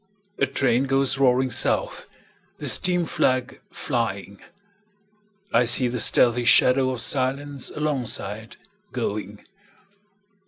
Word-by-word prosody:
A 140 Hz, -, +2 dB
train 130 Hz, -1 st, +1 dB
goes 135 Hz, 0 st, +1 dB
roaring 130 Hz, -1 st, +2 dB
south, -, -, -1 dB, 0.5 s
The -, -, -6 dB
steam 180 Hz, -1 st, +1 dB
flag 130 Hz, -4 st, -1 dB
flying;I 200 Hz, -, -5 dB
see 125 Hz, +2 st, +3 dB
the 125 Hz, 0 st, -4 dB
stealthy 120 Hz, +2 st, +3 dB
shadow 130 Hz, +2 st, +4 dB
of 125 Hz, -3 st, -4 dB
silenceAlongside 130 Hz, -5 st, -3 dB, 0.4 s
going. 105 Hz, -4 st, -5 dB
130 Hz, 90 wpm, -23 LUFS, 120-150 Hz, 0.5 s, shadow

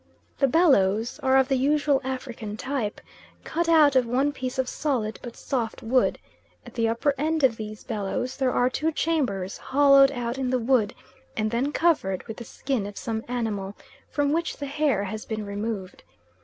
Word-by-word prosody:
The 275 Hz, -, +4 dB
bellows 240 Hz, -, +3 dB
are 265 Hz, 0 st, +4 dB
of 265 Hz, -1 st, +4 dB
the 270 Hz, -, +1 dB
usual 285 Hz, +1 st, +2 dB
African 245 Hz, -5 st, -5 dB
type, 255 Hz, -6 st, -3 dB, 0.4 s
cut 335 Hz, 0 st, -1 dB
out 305 Hz, -4 st, +6 dB
of 255 Hz, -2 st, +4 dB
one 265 Hz, +5 st, +1 dB
piece 260 Hz, -2 st, -5 dB
of 260 Hz, -1 st, 0 dB
solid 245 Hz, -7 st, -2 dB
but 240 Hz, -2 st, -8 dB
soft 235 Hz, -5 st, -3 dB
wood; 250 Hz, +3 st, +2 dB, 0.5 s
at -, -, -12 dB
the 230 Hz, -2 st, +1 dB
upper 255 Hz, +6 st, +1 dB
end 315 Hz, +1 st, 0 dB
of 250 Hz, -4 st, +4 dB
these 215 Hz, -1 st, -7 dB
bellows 225 Hz, +3 st, -3 dB
there 265 Hz, -2 st, +1 dB
are 245 Hz, -, +2 dB
two 310 Hz, +5 st, 0 dB
chambers 255 Hz, -, -1 dB
hollowed 275 Hz, 0 st, +5 dB
out 245 Hz, -1 st, -3 dB
in 260 Hz, -1 st, -1 dB
the 255 Hz, -, +2 dB
wood 235 Hz, -3 st, +1 dB, 0.4 s
and 215 Hz, 0 st, 0 dB
then 250 Hz, +5 st, 0 dB
covered 295 Hz, -, +1 dB
with 225 Hz, -2 st, -8 dB
the 240 Hz, -, -8 dB
skin 250 Hz, -4 st, -3 dB
of 205 Hz, -, -9 dB
some 225 Hz, -2 st, -3 dB
animal, 215 Hz, -5 st, -3 dB, 0.3 s
from 285 Hz, -1 st, 0 dB
which 335 Hz, +2 st, -1 dB
the 285 Hz, -, -4 dB
hair 280 Hz, -7 st, 0 dB
has 215 Hz, +2 st, -5 dB
been 215 Hz, -1 st, -4 dB
removed. 200 Hz, -2 st, -5 dB
255 Hz, 180 wpm, -25 LUFS, 220-280 Hz, 0.5 s, out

